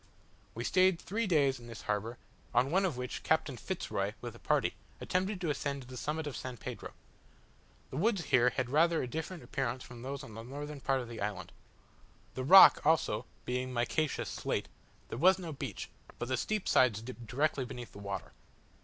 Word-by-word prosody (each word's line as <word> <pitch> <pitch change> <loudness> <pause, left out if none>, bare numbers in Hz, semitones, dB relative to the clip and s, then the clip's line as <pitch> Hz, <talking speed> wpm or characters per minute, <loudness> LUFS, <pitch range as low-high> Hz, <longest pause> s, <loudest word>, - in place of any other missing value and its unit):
We 115 - -3
stayed 185 +3 +4
three 220 +3 -2
days 140 -7 +3
in 120 - -12
this 115 -1 -9
harbour, 105 +3 -2 0.4
on 125 +3 +3
one 190 +3 +3
of 165 -9 -1
which 125 0 -4
Captain - - +1
Fitz - - -5
Roy, - - -1
with - - -6
a - - -14
party, - - +1 0.3
attempted 185 +2 -1
to 165 -4 +1
ascend 140 -1 -3
to - - -15
the 130 - -9
summit 150 +5 -2
of 145 - -4
San 125 -1 -6
Pedro. - - -7 1.0
The 130 - -4
woods 200 +1 +2
here 125 -4 +4
had 125 0 -2
rather 165 +3 +4
a - - -3
different 160 +6 -5
appearance 130 -1 -2
from 120 -1 -11
those 140 +2 -5
on 115 - -10
the 115 - -7
northern 145 +4 -7
part 135 -1 +1
of 120 - -7
the 115 -2 -7
island. 100 -1 -3 0.8
The 130 - -3
rock, 190 +8 +9
also, 150 -7 +2 0.2
being 125 +1 -2
micaceous 125 +5 0
slate, - - -2 0.4
there 115 - -5
was 185 +5 +6
no 170 -4 -6
beach, 140 - -6 0.3
but 120 - -4
the 130 - +2
steep 215 - -2
sides 110 -4 +4
dipped 120 -1 -8
directly 140 +3 +1
beneath 125 -1 -7
the - - -11
water. 100 -1 -5
130 Hz, 200 wpm, -32 LUFS, 120-160 Hz, 1.0 s, rock